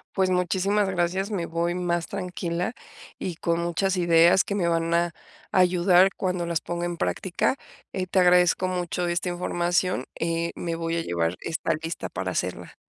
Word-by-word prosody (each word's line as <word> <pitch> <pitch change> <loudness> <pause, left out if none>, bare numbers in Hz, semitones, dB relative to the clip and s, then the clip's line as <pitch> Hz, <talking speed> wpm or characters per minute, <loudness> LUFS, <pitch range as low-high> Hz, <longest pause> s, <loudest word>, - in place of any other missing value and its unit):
Pues, 190 -1 +2
muchísimas 190 +3 +1
gracias, 185 +2 0
me 180 -5 -2
voy 170 +1 -1
más 175 -2 -1
tranquila 180 0 -3 0.5
y 180 -3 -3
con 170 0 -1
muchas 185 +2 0
ideas 170 +1 +5
que 200 - -2
me 175 -4 +1
van 165 0 0
a 170 0 +2 0.4
ayudar 180 0 +5
cuando 180 -2 -1
las 170 -1 -1
ponga 175 0 -3
en 175 0 -3
práctica. 190 +9 -1 0.3
Eh, 185 -1 -3
te 185 - +2
agradezco 180 0 +4
mucho 180 -1 -2
esta 175 +2 -1
información, 175 -3 0
eh, 165 0 -1
me 170 -1 -3
voy 165 0 -2
a 170 - 0
llevar 85 - -1
esta 165 -1 -2
lista 165 +1 -4
para - - -4
hacerla. - - -4
175 Hz, 170 wpm, -25 LUFS, 170-185 Hz, 0.5 s, ideas